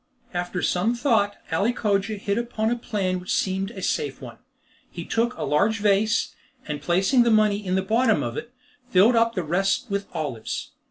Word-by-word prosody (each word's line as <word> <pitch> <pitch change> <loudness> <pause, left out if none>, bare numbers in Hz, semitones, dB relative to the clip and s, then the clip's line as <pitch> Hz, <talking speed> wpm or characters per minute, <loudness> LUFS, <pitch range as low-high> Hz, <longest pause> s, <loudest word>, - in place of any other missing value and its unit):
After 175 0 -3
some 210 +7 +1
thought, 225 -5 +1
Ali 200 +9 +1
Cogia 205 -2 0
hit 200 +2 -1
upon 230 -2 -1
a - - +2
plan 195 -6 -2
which 180 - -2
seemed 190 +1 -1
a 195 -5 -8
safe 450 -2 -1
one. - - -10 0.5
He - - -7
took 235 +2 0
a - - -3
large 205 +9 +2
vase, 210 +2 +2 0.3
and 150 -1 -4
placing 190 - +3
the 235 - +3
money 215 -2 +3
in 185 -1 -1
the 190 - +1
bottom 220 - +2
of 120 -1 -4
it, 235 0 -6 0.4
filled 215 +4 +5
up 230 0 +2
the 180 - -1
rest 195 +7 0
with 200 0 -2
olives. 145 -9 -4
200 Hz, 185 wpm, -24 LUFS, 185-230 Hz, 0.5 s, filled